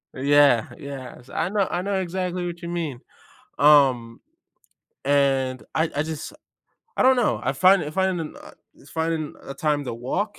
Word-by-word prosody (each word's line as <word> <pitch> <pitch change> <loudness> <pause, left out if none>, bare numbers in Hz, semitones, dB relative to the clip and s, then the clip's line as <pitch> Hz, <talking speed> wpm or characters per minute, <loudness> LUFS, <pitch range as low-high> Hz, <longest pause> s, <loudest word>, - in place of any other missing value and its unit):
yeah, 140 -3 +4
yes, 130 -3 -9
I 170 - -1
know 200 -2 +1
I 175 +1 -2
know 195 -1 -1
exactly 180 0 -3
what 175 0 -7
you 170 - -4
mean, 165 -7 -3 0.6
um, 135 -6 +4 0.8
and 135 -3 +1
I 160 +1 +1
I 145 - +1
just 160 - -6 0.6
I - - +3
don't 260 +1 +6
know, 210 - +1
I 130 - +1
find 185 +4 +4
I 150 - -5
find 190 +1 0
m 160 -2 -6
uh, - - -12 0.2
it's 140 - -19
finding 160 -1 -2
a - - -7
time 150 -1 0
to 125 - -4
walk 185 - -3
150 Hz, 175 wpm, -24 LUFS, 135-180 Hz, 0.8 s, don't